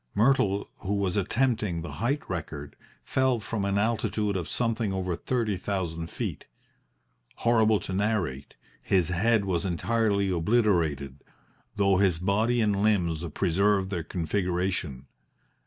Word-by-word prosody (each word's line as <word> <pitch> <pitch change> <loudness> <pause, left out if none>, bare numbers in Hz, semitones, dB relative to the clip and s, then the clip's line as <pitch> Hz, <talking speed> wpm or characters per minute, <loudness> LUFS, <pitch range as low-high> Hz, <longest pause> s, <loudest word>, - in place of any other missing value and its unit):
Myrtle, 105 -4 +2
who 100 +1 -3
was 95 -3 0
attempting 105 -4 0
the 85 - -6
height 120 - -2
record, 75 -5 -5 0.3
fell 130 -2 +1
from 110 -1 -3
an 100 0 0
altitude 105 -1 0
of 90 -3 -3
something 115 -3 0
over 95 -2 -2
thirty 110 +1 -1
thousand 85 -4 -3
feet. - - -5 0.9
Horrible 110 -3 +3
to 95 - -5
narrate, 95 -9 -1 0.3
his 90 -4 +1
head 105 +4 +2
was 90 -3 0
entirely 100 +1 +1
obliterated, 85 - +1 0.5
though 100 -2 +3
his 95 -4 +3
body 110 +7 +1
and 105 -2 +1
limbs 90 -7 +1
preserved 100 +2 +2
their 90 -4 -1
configuration. 90 -4 -2
100 Hz, 125 wpm, -27 LUFS, 85-110 Hz, 0.9 s, Horrible